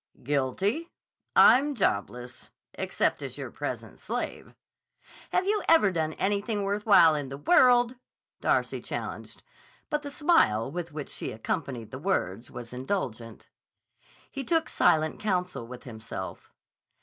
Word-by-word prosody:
"Guilty! 150 - 0 0.5
I'm 285 +3 +6
jobless, 125 - -2 0.2
except - - -1
as - - -6
your - - -6
present - - -6
slave." - - -5 0.8
"Have 370 - +1
you 415 +1 +1
ever 265 -12 +6
done 160 -3 -1
anything 205 +3 -1
worth 205 +2 -2
while 170 -6 +7
in 145 -3 -3
the 135 - -6
world?" 245 - +4 0.4
Darcy - - +1
challenged; - - -6 0.5
but 300 -1 0
the 290 - -6
smile 280 - +2
with 175 0 -5
which 150 -1 -6
she - - -3
accompanied 115 +1 -4
the - - -6
words 95 +7 -1
was 120 0 -9
indulgent. 125 - -4 0.8
He 275 - -4
took 325 +4 +1
silent 155 0 +2
counsel 180 - -2
with 125 0 -10
himself. 110 -5 -8
170 Hz, 130 wpm, -28 LUFS, -, 0.8 s, while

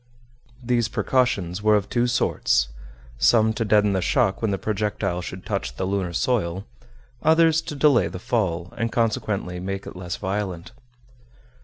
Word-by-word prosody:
These 120 -2 +1
precautions 105 -7 0
were 110 0 +4
of 105 -1 0
two 120 0 +1
sorts, 65 - +1 0.5
some 110 -1 +4
to 110 +1 -1
deaden 105 -2 +3
the 95 - 0
shock 110 -2 +1
when 110 - +1
the 100 - 0
projectile 105 -4 -2
should 90 +1 -8
touch 100 -2 -3
the 95 - -2
lunar 95 -2 -1
soil, 95 -2 -1 0.6
others 160 0 +4
to 150 - -7
delay 140 -3 +4
the - - -6
fall, 95 -6 -2
and 115 +1 -2
consequently 105 -5 -1
make 95 +2 -4
it - - -9
less 90 -1 -5
violent. 95 -3 -4
105 Hz, 155 wpm, -23 LUFS, 95-115 Hz, 0.6 s, were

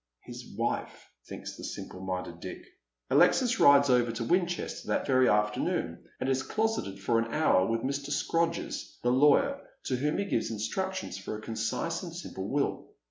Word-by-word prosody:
" - - -59
His - - -10
wife," - - -2 0.2
thinks - - -7
the - - -10
simple 90 - -6
minded 90 -2 -4
Dick. - - -8 0.5
Alexis 250 -1 +4
rides 140 0 +7
over 120 -2 +3
to 115 +1 -3
Winchester 175 +5 -1
that - - 0
very 130 -2 +4
afternoon, 105 0 0
and 130 - -2
is 135 0 +1
closeted 215 - -1
for 115 +4 +2
an 115 0 -2
hour 105 -12 +3
with 115 0 0
Mr. 140 +2 -3
Scrodgers, 165 +3 -1
the 120 - +3
lawyer, 150 - +4 0.2
to 130 - -1
whom 150 +4 0
he 200 - 0
gives - - -1
instructions 190 - -3
for 105 +2 -5
a - - -10
concise 115 +9 -2
and 170 -3 -7
simple 95 - -6
will. 140 0 -1
130 Hz, 175 wpm, -29 LUFS, 110-165 Hz, 0.5 s, rides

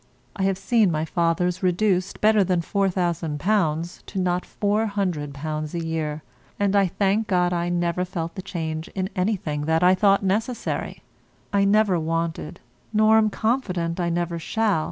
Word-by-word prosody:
I 200 - -5
have 195 -1 +1
seen 215 +1 +2
my 155 -1 -1
father's 170 +2 0
reduced, 185 0 +1
better 215 -1 +5
than 180 -2 +1
£4000, 175 -2 -1
to 195 - -4
not 180 -1 0 0.2
£400 160 -8 -1
a 165 -1 -3
year, 155 -2 -3 0.4
and 200 0 +1
I 200 -1 +4
thank 200 +4 0
God 180 -3 +2
I 175 0 -1
never 175 0 0
felt 170 -2 -4
the 190 - -6
change 160 -4 -4
in 190 0 -2
anything 180 -7 -1
that 160 +2 +2
I 180 +1 +6
thought 195 +1 +3
necessary. 220 +6 -2 0.5
I 200 0 +3
never 200 -3 +3
wanted, 165 -1 -3 0.3
nor 215 0 +5
am 215 -1 +3
confident 190 -7 -1
I 175 -1 0
never 170 0 -2
shall. 210 +1 +1
180 Hz, 155 wpm, -24 LUFS, 165-200 Hz, 0.5 s, I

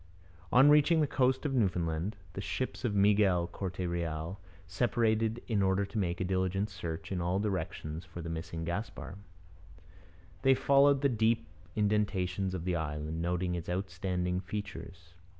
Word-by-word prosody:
On 135 +4 +7
reaching 150 +3 +5
the 155 - +4
coast 130 0 +1
of 140 - 0
Newfoundland, 90 -4 0 0.2
the 100 - -4
ships 130 +7 -3
of 110 -5 0
Miguel 100 -3 +4
Corte 90 +1 -5
Real 85 +1 -3 0.3
separated 110 +3 +1
in 110 -4 +1
order 95 +1 +2
to 105 - -7
make 90 -3 -1
a - - 0
diligent 95 +2 0
search 85 -3 -5
in 90 -2 -1
all 90 +2 0
directions 90 -5 -3
for 85 -1 -10
the 85 - -5
missing 80 0 -4
Gaspar. 95 +2 -5 1.2
They 135 -1 +5
followed 140 +1 +4
the 140 - +3
deep 115 - +2 0.3
indentations 100 -3 0
of 85 -2 -5
the 90 -1 0
island, 80 0 -3
noting 90 +1 0
its 85 -1 -4
outstanding 90 -1 -1
features. 95 -3 -7
95 Hz, 150 wpm, -31 LUFS, 85-110 Hz, 1.2 s, On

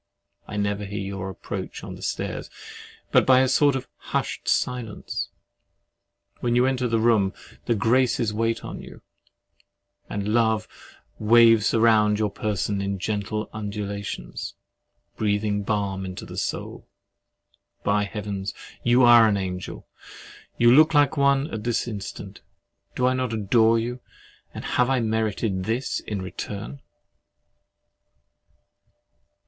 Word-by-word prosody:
I 105 - -5
never 100 0 -1
hear 100 +1 -6
your 95 -1 -4
approach 95 - -6
on - - -7
the - - -11
stairs, - - -3 0.6
but - - +5
by 130 -1 +5
a 130 - +3
sort 140 +2 +3
of 130 -1 -4
hushed - - -3
silence. 120 -4 -1 1.1
When 120 -1 0
you 125 +1 +4
enter 130 -1 +1
the 115 -1 +1
room, 110 -4 +3 0.3
the 120 - +2
Graces 115 0 +2
wait 115 +1 -1
on - - -7
you, - - -13 1.1
and 105 +1 -2
Love 110 -2 +2 0.5
waves 115 0 +5
round 110 -2 +4
your 105 -1 0
person 100 -1 -2
in 100 0 -2
gentle 105 +2 -2
undulations, 100 -1 -5 0.6
breathing 105 -1 0
balm 100 -2 -1
into 95 -1 -6
the - - -9
soul! - - -4 1.0
By 105 0 +2
Heaven, 100 -2 -5 0.3
you 120 +2 +4
are 120 -2 +8
an 105 -2 +2
angel! 90 -1 -5 0.7
You 120 0 +6
look 155 +4 +6
like 145 +1 +4
one 140 0 +3
at 110 -1 -4
this 120 +1 0
instant! 105 -4 -7 0.5
Do 125 - +1
I 130 - +3
not 130 -2 -1
adore 110 +2 +3
you—and 120 +2 -8
have 125 +1 +1
I 135 -1 +2
merited 110 -4 -1
this 115 +5 -1
return? 100 +5 -5
110 Hz, 125 wpm, -24 LUFS, 100-120 Hz, 1.1 s, are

